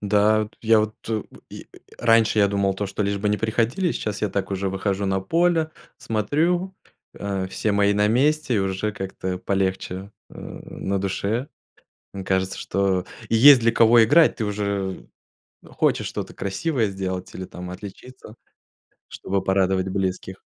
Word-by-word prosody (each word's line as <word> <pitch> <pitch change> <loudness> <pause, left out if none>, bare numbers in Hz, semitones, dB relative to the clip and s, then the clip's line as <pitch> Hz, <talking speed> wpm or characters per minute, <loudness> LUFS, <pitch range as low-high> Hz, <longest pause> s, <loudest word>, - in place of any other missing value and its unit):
Да. 105 +1 +3
Вот, 105 +1 -9
я 110 -1 +5
вот, 110 0 -2
э, 110 -2 -1 0.3
я, - - -9 0.3
раньше 115 -2 +3
я 100 -1 +5
думал 100 -1 0
то, 100 +1 -3
что 95 +2 -3
лишь 100 0 -1
бы 105 +1 -1
не 105 - +1
приходили, 115 - 0
сейчас 105 -1 -4
я 105 - +1
так 100 0 -3
уже 95 0 -1
выхожу 95 +1 -2
на 95 0 0
поле, 165 - +1 0.3
смотрю, 165 - 0 0.4
э, 100 -2 -3
все 105 +2 -1
мои 100 0 +3
на 105 +1 +2
месте, 135 +1 +2
уже 95 +2 -2
как-то 95 -2 -5
полегче, 95 0 -2 0.2
э, - - -13
на 100 0 -5
душе. 100 +7 -2 0.8
Кажется, 95 0 0
что 95 -2 0 0.3
есть 125 +4 +8
для 115 0 +2
кого 115 0 +6
играть, 155 +7 +5
ты 110 - -2
уже 100 -2 -3 0.6
хочешь - - 0
что-то - - -5
красивое 110 +5 -1
сделать 95 -1 -5
или, 95 - -6
там, 90 0 -8
отличиться, 110 +5 -11 0.7
чтобы 95 0 -3
порадовать 95 0 +1
близких. 95 0 -3
100 Hz, 150 wpm, -23 LUFS, 95-115 Hz, 0.8 s, есть